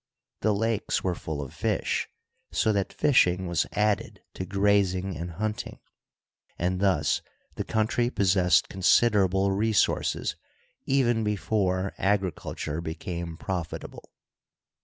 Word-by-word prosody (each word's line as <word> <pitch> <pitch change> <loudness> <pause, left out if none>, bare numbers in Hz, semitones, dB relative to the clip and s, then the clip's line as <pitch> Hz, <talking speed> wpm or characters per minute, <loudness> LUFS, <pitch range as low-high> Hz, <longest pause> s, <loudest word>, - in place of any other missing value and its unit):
The 110 - +2
lakes 110 +1 0
were 95 - +1
full 80 -3 -5
of 65 - -10
fish, - - -1 0.4
so 110 - +2
that 100 -2 -1
fishing 95 -10 +3
was 85 -3 0
added 105 0 0
to 95 - -5
grazing 95 -1 +1
and 85 +1 -5
hunting, 110 +4 -4 0.8
and 90 +1 -1
thus 95 -7 +2 0.3
the - - -3
country 115 +2 +1
possessed 95 -6 +3
considerable 95 -1 +3
resources 105 +2 +1 0.5
even 120 -4 +2
before 100 -3 0
agriculture 95 -5 -1
became 85 0 -5
profitable. 90 -3 -5
95 Hz, 110 wpm, -27 LUFS, 90-105 Hz, 0.8 s, fishing